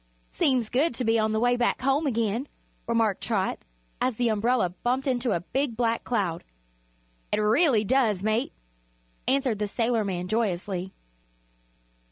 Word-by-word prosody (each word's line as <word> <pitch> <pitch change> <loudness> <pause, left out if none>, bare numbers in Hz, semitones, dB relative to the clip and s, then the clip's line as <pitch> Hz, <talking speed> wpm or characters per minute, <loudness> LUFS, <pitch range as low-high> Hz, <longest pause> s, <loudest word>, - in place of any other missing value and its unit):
"Seems 255 -6 +1
good 270 +1 +1
to 250 - -2
be 225 0 +3
on 220 0 +1
the 220 - 0
way 245 +1 +3 0.2
home 275 +4 +1
again," 230 +1 -1 0.4
remarked 225 -4 +1
Trot, 205 -5 -1 0.4
as 255 -2 +1
the 240 +1 +1
umbrella 220 -1 +1
bumped 245 +9 -2
into 250 -3 0
a 170 - 0
big 255 +4 -2
black 230 -1 0
cloud. 190 -9 -1 0.9
"It - - +1
reely 220 +2 +3
does, 215 -4 +2
mate," 220 +4 0 0.8
answered 260 -5 +1
the 210 - 0
sailorman, 205 -6 -1
joyously. 190 -3 -1
230 Hz, 140 wpm, -26 LUFS, 210-250 Hz, 0.9 s, be